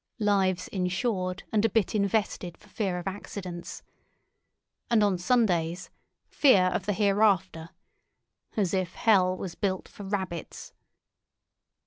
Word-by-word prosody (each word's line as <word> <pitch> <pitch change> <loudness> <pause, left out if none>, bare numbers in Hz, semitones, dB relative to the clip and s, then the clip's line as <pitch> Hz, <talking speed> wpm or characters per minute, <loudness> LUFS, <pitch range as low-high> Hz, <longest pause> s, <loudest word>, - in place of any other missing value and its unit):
Lives 195 -4 +1
insured 185 0 -2
and 215 -1 +2
a 225 - +3
bit 215 -2 +1
invested 200 -4 -1
for 210 - -21
fear 195 -5 -2
of 175 - -6
accidents. 185 -3 -7 1.1
And 225 -3 +4
on 195 -3 +1
Sundays—fear 185 - +1
of 195 - -3
the 205 - +2
hereafter. 195 -5 +2 0.9
As 195 -4 +1
if 185 -2 -1
hell 185 -5 +3
was 180 -3 -5
built 190 0 -2
for - - -13
rabbits! 190 -4 -5
190 Hz, 115 wpm, -27 LUFS, 180-210 Hz, 1.1 s, And